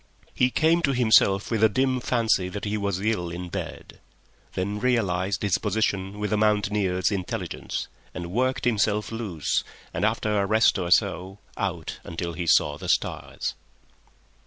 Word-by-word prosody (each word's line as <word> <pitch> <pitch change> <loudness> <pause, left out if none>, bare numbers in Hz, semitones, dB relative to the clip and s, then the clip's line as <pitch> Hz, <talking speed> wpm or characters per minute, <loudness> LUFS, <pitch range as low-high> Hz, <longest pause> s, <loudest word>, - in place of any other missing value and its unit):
He 125 - +3
came 165 +5 +3
to 140 -5 +1
himself 105 -4 +4
with 110 -1 +1
a 110 - +7
dim 130 +4 +1
fancy 110 -7 +1
that 100 +2 -5
he 105 +1 -1
was 100 -3 -1
ill 100 -4 -1
in 90 +1 -6
bed; - - -7 0.5
then 100 +3 -2
realized 100 -6 0
his 100 -3 +2
position 100 -2 -1
with 105 +1 -2
a - - +2
mountaineer's 105 -3 +1
intelligence 95 -3 -4 0.2
and 85 -1 -6
worked 130 +5 0
himself 105 -2 +1
loose 105 -9 -1 0.3
and, - - -2
after 105 -1 +1
a 100 - 0
rest 110 -1 +4
or 90 -2 -2
so, 95 +2 +2 0.2
out - - -3
until 85 0 -4
he 85 0 -4
saw 75 -2 +3
the - - -6
stars. - - -1
105 Hz, 160 wpm, -25 LUFS, 95-110 Hz, 0.5 s, a